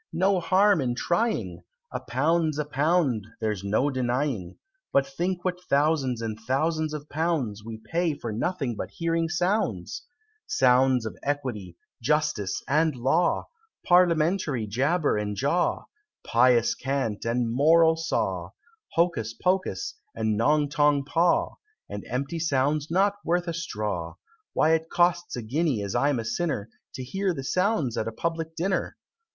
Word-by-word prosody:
no 190 Hz, +1 st, +2 dB
harm 190 Hz, 0 st, +3 dB
in 120 Hz, -2 st, -1 dB
trying! 220 Hz, -, -1 dB, 0.3 s
A -, -, -3 dB
pound's 155 Hz, +5 st, 0 dB
a 150 Hz, -, -1 dB
pound 145 Hz, -, +1 dB
there's 105 Hz, -3 st, -2 dB
no 110 Hz, +8 st, +1 dB
denying; 125 Hz, -7 st, -2 dB, 0.3 s
But 140 Hz, 0 st, +3 dB
think 175 Hz, +7 st, -3 dB
what 180 Hz, -1 st, -2 dB
thousands 140 Hz, -5 st, +1 dB
and 110 Hz, -1 st, -4 dB
thousands 155 Hz, +6 st, 0 dB
of 150 Hz, 0 st, -7 dB
pounds 145 Hz, -10 st, -1 dB
We 110 Hz, 0 st, -7 dB
pay 165 Hz, +7 st, -1 dB
for 120 Hz, -5 st, -5 dB
nothing 135 Hz, -, -2 dB
but -, -, -5 dB
hearing 165 Hz, -1 st, -1 dB
sounds: 175 Hz, -, -1 dB, 0.5 s
Sounds 130 Hz, -, +3 dB
of 110 Hz, -, -5 dB
Equity, 125 Hz, -12 st, -3 dB, 0.2 s
Justice, 150 Hz, -7 st, 0 dB
and 155 Hz, +1 st, +2 dB
Law, 135 Hz, +8 st, +1 dB, 0.4 s
Parliamentary 170 Hz, -, +3 dB
jabber 140 Hz, -, +1 dB
and 105 Hz, -1 st, -2 dB
jaw, 145 Hz, -, 0 dB, 0.4 s
Pious 120 Hz, 0 st, +4 dB
cant 135 Hz, -6 st, -2 dB
and 115 Hz, 0 st, 0 dB
moral 160 Hz, +4 st, +5 dB
saw, 165 Hz, +1 st, -2 dB, 0.4 s
Hocus 140 Hz, -10 st, 0 dB
pocus, 190 Hz, -, -1 dB, 0.2 s
and 110 Hz, -1 st, 0 dB
Nong 145 Hz, +7 st, +2 dB
tong 145 Hz, -1 st, +2 dB
paw, 170 Hz, +4 st, +1 dB, 0.3 s
And -, -, -6 dB
empty 140 Hz, +6 st, -2 dB
sounds 145 Hz, -1 st, 0 dB
not 195 Hz, +4 st, +2 dB
worth 175 Hz, +1 st, 0 dB
a 170 Hz, -, -2 dB
straw; 105 Hz, -, -4 dB, 0.4 s
Why 155 Hz, -, +3 dB
it 160 Hz, 0 st, 0 dB
costs 175 Hz, 0 st, +1 dB
a 120 Hz, -, -5 dB
guinea, 135 Hz, -1 st, 0 dB
as 100 Hz, -, -4 dB
I'm 140 Hz, +2 st, +2 dB
a 115 Hz, -, -3 dB
sinner, 115 Hz, -5 st, -2 dB, 0.2 s
To 130 Hz, -, -5 dB
hear 190 Hz, +7 st, -1 dB
the 135 Hz, -, -5 dB
sounds 180 Hz, -, 0 dB
at 110 Hz, -, -2 dB
a -, -, -2 dB
Public 165 Hz, +5 st, -3 dB
Dinner! 185 Hz, +3 st, -1 dB
145 Hz, 145 wpm, -26 LUFS, 120-170 Hz, 0.5 s, moral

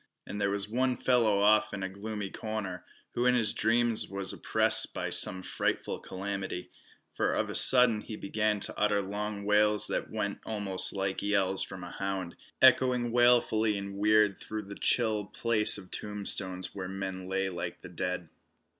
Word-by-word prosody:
And 105 Hz, -, -6 dB
there 100 Hz, -, +1 dB
was 100 Hz, 0 st, -1 dB
one 125 Hz, +3 st, 0 dB
fellow 115 Hz, -6 st, +2 dB
off 110 Hz, 0 st, +3 dB
in 95 Hz, -, -5 dB
a -, -, -1 dB
gloomy 100 Hz, +1 st, -6 dB
corner, 105 Hz, -5 st, -5 dB, 0.3 s
who 120 Hz, +1 st, 0 dB
in 125 Hz, -, +4 dB
his 110 Hz, -4 st, +2 dB
dreams 115 Hz, +1 st, +1 dB
was 100 Hz, -1 st, -1 dB
oppressed -, -, +3 dB
by -, -, -3 dB
some 95 Hz, 0 st, +2 dB
frightful -, -, -2 dB
calamity, 95 Hz, -1 st, -5 dB, 0.4 s
for -, -, 0 dB
of -, -, -1 dB
a -, -, -6 dB
sudden 125 Hz, -4 st, +6 dB
he 110 Hz, -, -8 dB
began 105 Hz, +1 st, -1 dB
to -, -, +1 dB
utter 105 Hz, -1 st, +1 dB
long 100 Hz, +1 st, -4 dB
wails 105 Hz, 0 st, +3 dB
that -, -, -3 dB
went 105 Hz, -2 st, -3 dB
almost 100 Hz, -4 st, 0 dB
like 95 Hz, -1 st, -3 dB
yells 95 Hz, -2 st, +1 dB
from 95 Hz, -2 st, -5 dB
a 85 Hz, -, -8 dB
hound, 95 Hz, -3 st, -4 dB, 0.3 s
echoing 125 Hz, -2 st, +4 dB
wailfully 115 Hz, -3 st, +3 dB
and 100 Hz, 0 st, -6 dB
weird 105 Hz, 0 st, +3 dB
through 110 Hz, +2 st, -5 dB
this 100 Hz, 0 st, -10 dB
chill 110 Hz, -4 st, +1 dB
place 110 Hz, 0 st, +1 dB
of 95 Hz, -3 st, -10 dB
tombstones 100 Hz, -3 st, -2 dB
where 95 Hz, -2 st, -6 dB
men 95 Hz, -1 st, -5 dB
lay 95 Hz, 0 st, -1 dB
like 85 Hz, -2 st, -6 dB
the -, -, -10 dB
dead. 90 Hz, -2 st, -4 dB
105 Hz, 170 wpm, -29 LUFS, 95-110 Hz, 0.4 s, sudden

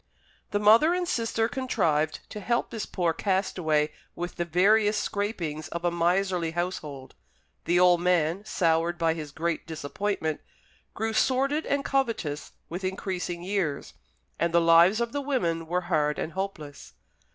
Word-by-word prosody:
The 205 Hz, -, 0 dB
mother 225 Hz, +12 st, +6 dB
and 360 Hz, -1 st, -1 dB
sister 225 Hz, -4 st, 0 dB
contrived 165 Hz, -, 0 dB
to 210 Hz, -, -6 dB
help 235 Hz, +4 st, -1 dB
this 225 Hz, -, -4 dB
poor 175 Hz, -3 st, 0 dB
castaway 170 Hz, -6 st, 0 dB, 0.2 s
with 175 Hz, 0 st, -5 dB
the 175 Hz, -, -1 dB
veriest 205 Hz, +5 st, +3 dB
scrapings 170 Hz, -9 st, -3 dB
of 170 Hz, +1 st, -5 dB
a 175 Hz, -, +2 dB
miserly 175 Hz, 0 st, +1 dB
household. 155 Hz, -6 st, -4 dB, 0.5 s
The 175 Hz, +1 st, +3 dB
old 180 Hz, -1 st, +5 dB
man, 175 Hz, +1 st, +1 dB
soured 170 Hz, -3 st, +1 dB
by 165 Hz, -1 st, +2 dB
his 155 Hz, -3 st, -7 dB
great 165 Hz, +2 st, -2 dB
disappointment, 160 Hz, +1 st, -3 dB, 0.5 s
grew 220 Hz, +1 st, -2 dB
sordid 275 Hz, +6 st, +1 dB
and 280 Hz, 0 st, 0 dB
covetous 230 Hz, -, -1 dB, 0.2 s
with 175 Hz, +3 st, -6 dB
increasing 185 Hz, -2 st, -3 dB
years, 180 Hz, -7 st, -2 dB, 0.5 s
and 170 Hz, -, +1 dB
the -, -, +7 dB
lives 170 Hz, +6 st, +5 dB
of 235 Hz, -1 st, -1 dB
the 285 Hz, -, -2 dB
women 170 Hz, -, -1 dB
were 180 Hz, +2 st, 0 dB
hard 155 Hz, -4 st, 0 dB
and 160 Hz, -, -3 dB
hopeless. 175 Hz, -, -6 dB
180 Hz, 150 wpm, -27 LUFS, 165-210 Hz, 0.5 s, the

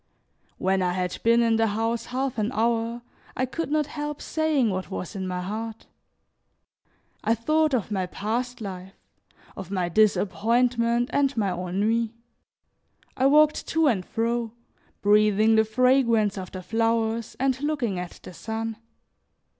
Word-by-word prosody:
When 190 Hz, 0 st, +1 dB
I 180 Hz, -1 st, +1 dB
had 180 Hz, -1 st, -2 dB
been 235 Hz, +1 st, +4 dB
in 225 Hz, -1 st, +3 dB
the 225 Hz, 0 st, +3 dB
house 225 Hz, +2 st, -1 dB
half 255 Hz, -1 st, -2 dB
an 215 Hz, +3 st, 0 dB
hour, 230 Hz, +1 st, 0 dB, 0.3 s
I 255 Hz, -, +1 dB
could 325 Hz, +6 st, -4 dB
not 305 Hz, 0 st, +2 dB
help 295 Hz, 0 st, -5 dB
saying 305 Hz, -8 st, +1 dB
what 185 Hz, 0 st, -4 dB
was 190 Hz, +1 st, -5 dB
in 190 Hz, -1 st, -3 dB
my 180 Hz, 0 st, -3 dB
heart. 220 Hz, +4 st, -5 dB, 1.4 s
I 225 Hz, +2 st, +2 dB
thought 310 Hz, +5 st, +2 dB
of 220 Hz, -3 st, -2 dB
my 190 Hz, -3 st, -1 dB
past 235 Hz, +6 st, -3 dB
life, 190 Hz, -2 st, -7 dB, 0.6 s
of 190 Hz, -2 st, -8 dB
my 185 Hz, -3 st, -1 dB
disappointment 235 Hz, +5 st, +2 dB
and 275 Hz, -2 st, +1 dB
my 200 Hz, -4 st, +1 dB
ennui; 210 Hz, +6 st, -1 dB, 1.0 s
I 260 Hz, -, +3 dB
walked 305 Hz, +2 st, +4 dB
to 325 Hz, 0 st, +2 dB
and 220 Hz, -10 st, +2 dB
fro, 230 Hz, +2 st, -2 dB, 0.5 s
breathing 210 Hz, +1 st, +4 dB
the 220 Hz, 0 st, +5 dB
fragrance 235 Hz, -2 st, +3 dB
of 185 Hz, -2 st, -6 dB
the 185 Hz, -1 st, -7 dB
flowers, 225 Hz, +1 st, 0 dB
and 265 Hz, 0 st, 0 dB
looking 275 Hz, -11 st, -1 dB
at 180 Hz, -1 st, -8 dB
the -, -, -10 dB
sun. 225 Hz, +3 st, -4 dB
225 Hz, 145 wpm, -25 LUFS, 200-250 Hz, 1.4 s, the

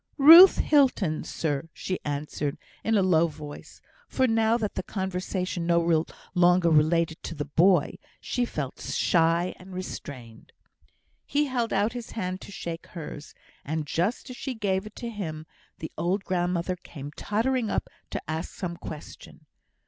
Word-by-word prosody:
"Ruth 330 Hz, +7 st, +10 dB
Hilton, 250 Hz, -, +2 dB
sir," 150 Hz, 0 st, -3 dB
she 185 Hz, -, -4 dB
answered, 145 Hz, 0 st, -3 dB, 0.3 s
in 225 Hz, -1 st, +2 dB
a 195 Hz, -, +3 dB
low 170 Hz, -3 st, +4 dB
voice, 150 Hz, -2 st, -10 dB, 0.3 s
for, 260 Hz, -, +1 dB
now 225 Hz, -1 st, +3 dB
that 215 Hz, -3 st, -3 dB
the -, -, -2 dB
conversation 185 Hz, -2 st, -3 dB
no 170 Hz, -2 st, +3 dB, 0.3 s
longer 175 Hz, -1 st, +4 dB
related 160 Hz, +1 st, +2 dB
to 165 Hz, -, -6 dB
the 145 Hz, -1 st, -3 dB
boy, 170 Hz, +2 st, +3 dB, 0.2 s
she 245 Hz, -, -1 dB
felt 150 Hz, -, -4 dB
shy 170 Hz, +1 st, +2 dB
and 185 Hz, 0 st, -11 dB
restrained. 125 Hz, -10 st, -8 dB, 0.7 s
He 295 Hz, +1 st, +1 dB
held 245 Hz, -4 st, -1 dB
out 205 Hz, +3 st, +1 dB
his 240 Hz, -2 st, -7 dB
hand 185 Hz, -3 st, -3 dB
to -, -, -10 dB
shake 170 Hz, -4 st, -6 dB
hers, 150 Hz, -3 st, -9 dB, 0.3 s
and 155 Hz, +1 st, -3 dB
just 180 Hz, -, -1 dB
as 250 Hz, -, -9 dB
she 265 Hz, -2 st, -4 dB
gave 195 Hz, -2 st, -1 dB
it 215 Hz, -, -13 dB
to 235 Hz, -, -5 dB
him, 160 Hz, -8 st, -5 dB, 0.3 s
the 160 Hz, -, -7 dB
old 185 Hz, +4 st, 0 dB
grandmother 180 Hz, 0 st, -1 dB
came 145 Hz, -4 st, -9 dB
tottering 225 Hz, -, -1 dB
up -, -, -1 dB, 0.2 s
to -, -, -3 dB
ask 160 Hz, +1 st, -4 dB
some 170 Hz, -3 st, -4 dB
question. 155 Hz, -3 st, -10 dB
180 Hz, 155 wpm, -27 LUFS, 160-210 Hz, 0.7 s, Ruth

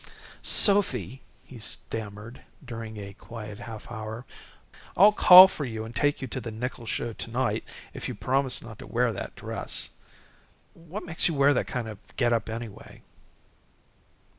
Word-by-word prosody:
"Sophy," 135 Hz, -, +4 dB, 0.2 s
he 125 Hz, -, -12 dB
stammered, 110 Hz, +2 st, -4 dB, 0.2 s
during 115 Hz, -3 st, -7 dB
a 100 Hz, -1 st, -8 dB
quiet 105 Hz, -1 st, -9 dB
half 115 Hz, -1 st, -9 dB
hour, 110 Hz, +2 st, -6 dB, 0.7 s
"I'll 205 Hz, +4 st, +8 dB
call 185 Hz, -2 st, +10 dB
for 155 Hz, -, -6 dB
you 110 Hz, -4 st, -5 dB
and 115 Hz, +1 st, -10 dB
take 145 Hz, -1 st, 0 dB
you -, -, -3 dB
to 130 Hz, -, -5 dB
the 115 Hz, -, -6 dB
nickel 115 Hz, +1 st, -6 dB
show 115 Hz, +1 st, -3 dB
to 115 Hz, -, -7 dB
night 125 Hz, +2 st, -1 dB, 0.3 s
if -, -, -6 dB
you'll -, -, -6 dB
promise 135 Hz, 0 st, 0 dB
not 110 Hz, -2 st, -11 dB
to -, -, -10 dB
wear 120 Hz, -1 st, 0 dB
that -, -, -7 dB
dress. -, -, -3 dB, 0.8 s
What 170 Hz, +5 st, -9 dB
makes 165 Hz, -1 st, 0 dB
you 165 Hz, -, -2 dB
wear 140 Hz, +1 st, +4 dB
that -, -, -1 dB
kind 125 Hz, -3 st, -4 dB
of 105 Hz, -3 st, -8 dB
a -, -, -26 dB
get 120 Hz, -2 st, +2 dB
up, 115 Hz, -2 st, -1 dB
anyway?" 115 Hz, -2 st, -8 dB
120 Hz, 165 wpm, -27 LUFS, 110-135 Hz, 0.8 s, call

